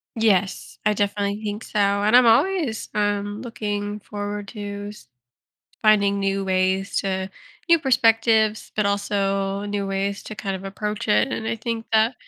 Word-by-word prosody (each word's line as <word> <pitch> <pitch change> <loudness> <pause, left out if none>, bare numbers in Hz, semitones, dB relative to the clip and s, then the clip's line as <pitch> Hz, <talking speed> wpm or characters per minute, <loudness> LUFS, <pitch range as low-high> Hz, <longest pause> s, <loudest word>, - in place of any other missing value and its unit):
Yes. 205 -4 +1
I 210 - +4
definitely 205 0 -1
think 210 +1 -4
so, - - -6
and 200 +2 +3
I'm 250 - +6
always, 245 - +2
um, 205 0 -1
looking 210 -3 -4
forward 205 0 -5
to 205 -2 -6
s 210 -11 -13 0.8
finding 200 -2 +4
new 195 0 0
ways 190 +1 0
to 190 -1 -2 0.4
new 335 0 +6
perspectives, 225 -5 +2
but 210 -1 +1
also 200 -1 -1
new 205 -1 -2
ways 195 +1 -2
to 215 - -7
kind 195 -2 -3
of 190 - -10
approach 210 +2 -4
it, 210 +5 +3
and 220 -4 -4
I 230 - -1
think 225 0 -4
that 220 +3 +3
205 Hz, 155 wpm, -23 LUFS, 200-220 Hz, 0.8 s, I'm